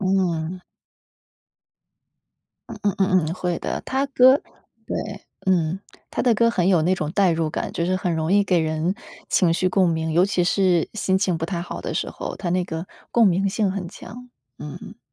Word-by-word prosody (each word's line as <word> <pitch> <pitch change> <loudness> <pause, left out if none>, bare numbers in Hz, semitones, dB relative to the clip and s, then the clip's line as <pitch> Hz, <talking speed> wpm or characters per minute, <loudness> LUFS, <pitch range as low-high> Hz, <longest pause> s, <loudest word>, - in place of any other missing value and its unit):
嗯。 185 -3 0 2.1
嗯 - - -7
嗯 200 -2 +1
嗯 185 -4 +3
嗯， - - -3
会 180 -2 -2
的。 - - -3
他 265 +1 0
歌 260 -1 +6 0.5
对， - - -4 0.2
嗯， 180 -1 +1 0.3
他 - - -2
的 245 -2 +3
歌 230 +2 +3
很 185 -5 +1
有 180 -5 +4
那 180 +4 +2
种 155 -4 -3
代 195 -1 +3
入 165 -1 0
感， - - -4
就 170 - -1
是 185 +1 +1
很 180 -2 -1
容 160 +1 -1
易 205 0 +4
给 185 -3 +2
人 160 +3 -1 0.4
情 175 -4 +3
绪 185 +2 +1
共 185 -1 +3
鸣， 160 -1 -1
尤 175 +3 +4
其 180 -3 +1
是 180 -2 +2
心 190 -3 0
情 190 -3 +1
不 165 - -2
太 170 -1 -3
好 - - -6
的 - - -4
时 - - -2
候， - - -6
他 175 - -3
那 180 +1 +1
个 165 0 -5 0.2
共 235 -2 +5
鸣 195 +1 +2
性 205 0 0
很 190 -3 -4
强， 245 +6 -11 0.3
嗯。 150 -4 -9
185 Hz, 205 characters per minute, -23 LUFS, 170-195 Hz, 2.1 s, 歌